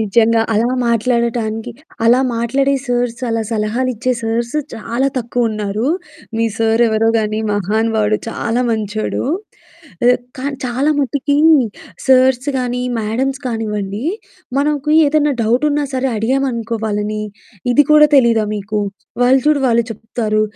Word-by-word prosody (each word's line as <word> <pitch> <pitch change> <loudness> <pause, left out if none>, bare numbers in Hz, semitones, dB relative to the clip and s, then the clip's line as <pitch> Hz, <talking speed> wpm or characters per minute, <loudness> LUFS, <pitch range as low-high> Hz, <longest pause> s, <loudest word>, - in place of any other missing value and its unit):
నిజంగా 225 +2 +3
అలా 225 +3 +2 0.2
మాట్లాడటానికి, 235 -1 0 0.3
అలా 245 +3 +5 0.2
మాట్లాడే 270 +4 +1
సార్స్, 245 -1 -1
అలా 225 -1 0
సలహాలు 225 +4 0
ఇచ్చే 255 +3 -1
సార్స్ 235 +3 -2 0.2
చాలా 235 +4 -1
తక్కువ 240 -1 -1
ఉన్నారు. 215 +4 -2 0.5
మీ 230 - +1
సారు 225 +1 +2
ఎవరో 220 +1 +2
కానీ 215 0 -1
మహానుబావాడు 215 +1 +1
చాలా 235 +1 -1
మంచోడు. 215 -1 -2 0.8
ఆహ్, 250 - +5 0.2
కానీ 275 +1 -3
చాలా 265 +5 0
మటుకి 285 +1 0 0.7
సార్స్ 260 +1 +4
కానీ, 250 0 -2 0.2
మ్యాడమ్స్ 260 +6 -2
కానివ్వండి. 210 -1 -3 0.5
మనకు 295 0 0 0.2
ఏదైనా 295 0 +2
డౌట్ 240 +6 +1
ఉన్నా 290 0 0
సరే 260 +1 0
అడిగామనుకో 235 -1 -1
వాలని, 215 0 -2 0.5
"ఇది 290 +3 +5
కూడా 300 0 +8
తెలీదా 230 -4 +4
మీకు 210 +1 -3 0.4
వాళ్ళు 260 +2 +5
చూడు 300 -2 +3
వాళ్ళు 235 -1 +2
చెప్తారు. 220 0 -2
235 Hz, 125 wpm, -17 LUFS, 220-255 Hz, 0.8 s, కూడా